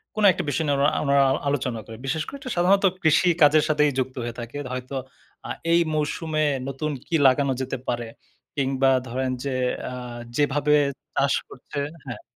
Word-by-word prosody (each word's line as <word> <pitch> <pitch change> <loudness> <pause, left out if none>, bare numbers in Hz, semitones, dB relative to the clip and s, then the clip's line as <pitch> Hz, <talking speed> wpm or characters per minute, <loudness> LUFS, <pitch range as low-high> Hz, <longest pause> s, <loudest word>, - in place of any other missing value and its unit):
কোন 215 - -1
একটা - - -3
বিষয় 160 - 0
নিয়ে 145 - +2
ঊনা 145 +2 +4
উনারা 140 -1 +4 0.2
আলোচনা 130 -5 -1
করে। 110 - -9
বিশেষ 155 +3 -1
করে 280 - -7 0.2
সাধারণত 195 +3 +4 0.2
কৃষি 160 +3 +4
কাজের 150 +1 +6
সাথেই 150 -1 +3
যুক্ত 130 0 -2
হয়ে 120 0 -5
থাকে। 120 +4 -7 0.2
হয়তো 130 +2 -5 0.5
অ্যা - - -5 0.2
এই 170 - +6 0.2
মৌসুমে 155 +1 -1 0.2
নতুন 145 +3 -3 0.2
কি 170 - -1
লাগানো 135 +1 +3
যেতে 130 +1 -3
পারে, 120 -1 -1 0.5
কিংবা 135 -1 +2 0.2
ধরেন 130 +2 -2
যে, 140 - -2 0.3
অ্যা - - -4 0.4
যেভাবে 145 0 +2 0.4
চাষ - - +2 0.2
করছে, 145 - -7 0.3
হ্যাঁ? - - -7
140 Hz, 165 wpm, -24 LUFS, 130-155 Hz, 0.5 s, কাজের